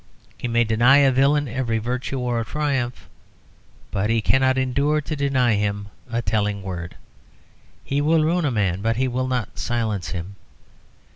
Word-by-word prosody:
He - - -4
may 120 0 +2
deny 120 +4 +5
a 140 -2 +5
villain 140 +3 +3
every 120 -1 -1
virtue 125 +4 -3
or 120 -2 -1
triumph, 135 -1 -2 0.8
but 100 +2 -1
he 115 0 +2
cannot 130 +4 +2
endure 140 +4 +1
to 155 +1 -4
deny 135 -4 +2
him 105 0 -1 0.2
a 120 0 -1
telling 105 -2 -1
word; 90 -2 -6 0.9
he 140 +1 -1
will 155 +1 +3
ruin 170 +3 +1
a - - +2
man, 100 -6 0
but 115 +2 +1
he 130 +1 +1
will 130 +1 -1
not 125 -5 -3
silence 110 -7 -2
him. 95 +2 -6
120 Hz, 160 wpm, -22 LUFS, 105-135 Hz, 0.9 s, deny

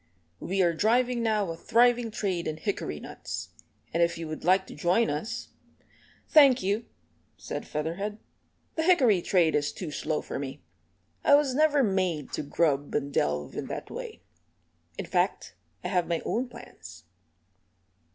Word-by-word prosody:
"We 190 +1 0
are 170 -1 +3
driving 240 +6 +2
now 215 -5 +1
a - - -5
thriving 240 +5 +3
trade 190 -6 -2
in 155 - -3
hickory 160 - -3
nuts, - - -7 0.4
and 170 - +1
if 170 0 +2
you 165 -1 -5
would 155 0 -6
like 185 +3 +4
to - - -10
join 180 +8 +2
us 150 +9 -4 0.4
" - - -30
"Thank 275 -5 +6
you," 205 +4 0 0.5
said - - -6
Featherhead, 170 +8 -3 0.6
"the 320 - -1
hickory 265 - +4
trade 170 -3 +3
is 145 0 +1
too 175 -5 -6
slow 155 +1 -2
for - - -5
me. 135 -9 -6 0.6
I 285 - +7
was 285 -3 +2
never 295 0 +4
made 185 - 0
to - - -2
grub 145 -1 0
and 140 -1 -1
delve 75 - 0
in - - -4
that - - -6
way. 90 - -7 0.7
In - - -4
fact - - 0 0.3
I 180 - -2
have 180 -3 +1
my 170 -2 -1
own 245 +3 -1
plans." 90 - -12
185 Hz, 160 wpm, -28 LUFS, 155-235 Hz, 0.7 s, I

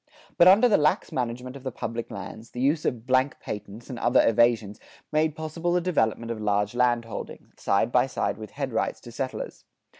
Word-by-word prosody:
But 175 - +6
under 205 +7 +7
the 215 - +4
lax 150 0 +1
management 125 +1 -3
of 140 - -9
the 130 0 -4
public 115 0 -5
lands, 110 +2 -8
the 125 - -8
use 145 +4 +1
of 120 -2 -2
"blank 130 +2 +2
patents" 105 +2 -7
and 125 -4 -6
other 120 +2 +4
evasions 115 -2 +2 0.3
made 155 0 +1
possible 160 +2 -2
the 180 - +3
development 115 -10 0
of 110 -2 -5
large 105 0 +1
landholding, 120 -2 -1
side 100 +4 +1
by 125 +1 +3
side 125 -4 -2
with 110 - -8
headrights 135 -5 -2
to 120 - -11
settlers. 130 +2 -5
125 Hz, 185 wpm, -26 LUFS, 115-145 Hz, 0.3 s, under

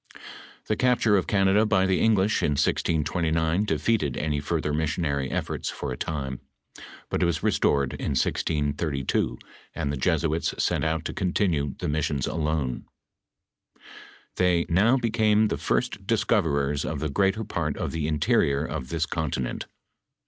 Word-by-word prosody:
The 110 - 0
capture 120 -3 +3
of 95 - +1
Canada 95 +1 +3
by 100 -3 +2
the 95 -1 +2
English, 110 -1 +3
in 75 - +1
1629, 80 +4 +1
defeated 105 - 0
any 75 -2 -1
further 75 0 -2
missionary 75 -3 -1
efibrts - - -3
for - - -5
a - - -3
time; 65 -3 -4 0.7
but - - 0
it 90 - +3
was 80 -3 -1
restored 70 -2 +2
in - - -3
1632, 75 -1 0 0.4
and 70 - -2
tlie 70 - -4
Jesuits 80 +1 0
sent - - 0
out 80 0 -1
to - - -3
continue 90 -7 0
the - - -4
mis 75 0 0
sions 70 -3 -1
alone. 75 -6 -2 1.5
Tliey 90 -2 +2
"now 105 +9 +4
became 110 -3 +2
the - - -1
first - - -1
discoverers 70 -2 +1
of 75 -2 -3
the 75 - -1
greater 100 +7 +1
part 80 -7 -3
of - - -3
the 80 -2 -2
interior 75 -1 +2
of 65 -4 -5
this 80 0 0
continent. 75 -6 -3
80 Hz, 150 wpm, -26 LUFS, 70-95 Hz, 1.5 s, now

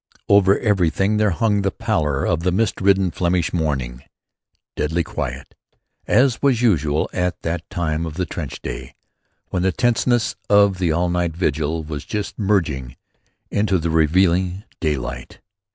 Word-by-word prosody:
Over 100 -1 +5
everything 100 -1 +1
there 105 0 +3
hung 105 +2 +1
the 100 - +1
pallor 75 -6 -1
of 85 - +1
the 90 +1 +1
mist 100 +2 0
ridden 95 -2 +3
Flemish 85 -1 0
morning, 65 -7 -2 0.7
deadly 80 +3 0
quiet, 65 -2 -5 0.5
as 130 -1 +3
was 135 -5 +3
usual 80 - +2
at 90 0 -2
that 85 0 -3
time 85 -1 -2
of 75 - -7
the 90 +1 -1
trench - - -6
day - - -6 0.5
when 90 - -1
the 95 +1 +2
tenseness 120 +4 +1
of 100 -2 +4
the 90 -3 +1
all 85 +3 +1
night 85 -2 -1
vigil 80 -1 -1
was 75 -2 -6
just 105 +9 -5
merging 80 - 0 0.6
into 100 -2 +1
the 85 -1 -2
relieving 90 +4 +2 0.2
daylight. 65 -6 -3
85 Hz, 150 wpm, -21 LUFS, 75-100 Hz, 0.7 s, Over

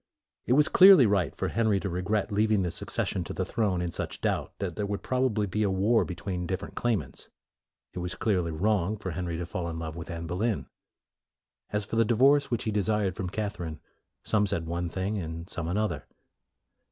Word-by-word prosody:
It 125 - +3
was 150 +2 +5
clearly 190 -7 +8
right 100 -7 +1
for - - -2
Henry 110 -2 +2
to - - -2
regret 95 +4 -1
leaving 105 -1 +2
the 90 - -1
succession - - -1
to - - -5
the - - -2
throne 100 -6 0
in 85 - -2
such - - -4
doubt - - -1
that - - -4
there 105 -1 -2
would 100 0 -4
probably 125 -5 +1
be 105 +2 -2
a 105 - +2
war 100 +5 +3
between 90 0 -4
different 95 +2 -4
claimants. 120 -4 -2 0.6
It - - -5
was 90 0 -4
clearly 90 -6 0
wrong 100 +4 0
for 95 -3 -5
Henry 85 0 -3
to 85 - -3
fall 85 0 -4
in 80 - -5
love 80 -1 -5
with 85 -1 -7
Anne 85 -1 -5
Boleyn. 90 - -1 1.0
As 105 0 -1
for 115 - -3
the 115 - +6
divorce 135 +5 +4
which 120 -3 -1
he 110 - -1
desired 105 -2 0
from 90 0 -3
Catherine, 90 -6 -4 0.4
some 105 -1 +2
said 95 -4 -1
one 85 +1 -2
thing, 95 +4 -2
and 85 0 -6
some 85 -3 -4
another. 90 -5 -1
100 Hz, 200 wpm, -28 LUFS, 85-110 Hz, 1.0 s, clearly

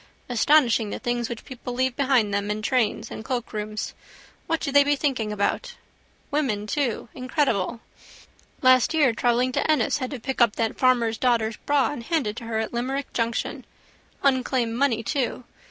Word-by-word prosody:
Astonishing 245 -3 +3
the - - -4
things 240 -1 -2 0.2
people 250 -1 -7
leave 260 0 0
behind 255 -7 +2
them 200 0 -1
in 210 +1 -2
trains 220 -2 0
and - - -6
cloakrooms. 215 -3 -4 0.5
What 330 - 0
do 280 - -3
they 285 +1 +6
be 290 +1 +2
thinking 260 -7 -1
about? 485 - -1 0.6
Women 250 -9 0
too. 250 -1 -1
Incredible. 255 - -1 0.8
Last 255 +3 +5
year 285 -7 +4
travelling 245 +2 +1
to 255 - -1
Ennis 290 -4 +1
had 255 -2 -3
to 275 - -6
pick 265 +2 -3
up 235 -3 +4
that 225 -1 -2
farmer's 235 -3 +2
daughter's 230 -3 +1
bag 285 -2 +3
and 255 -5 -6
hand 325 -4 0
it 210 0 -3
to 235 - -7
her 225 -1 -2
at 220 +1 -2
Limerick 265 +4 -3
junction. 230 -1 -2 0.6
Unclaimed 255 -3 +1
money 235 -2 +1
too. 250 +3 -2
245 Hz, 170 wpm, -25 LUFS, 225-270 Hz, 0.8 s, they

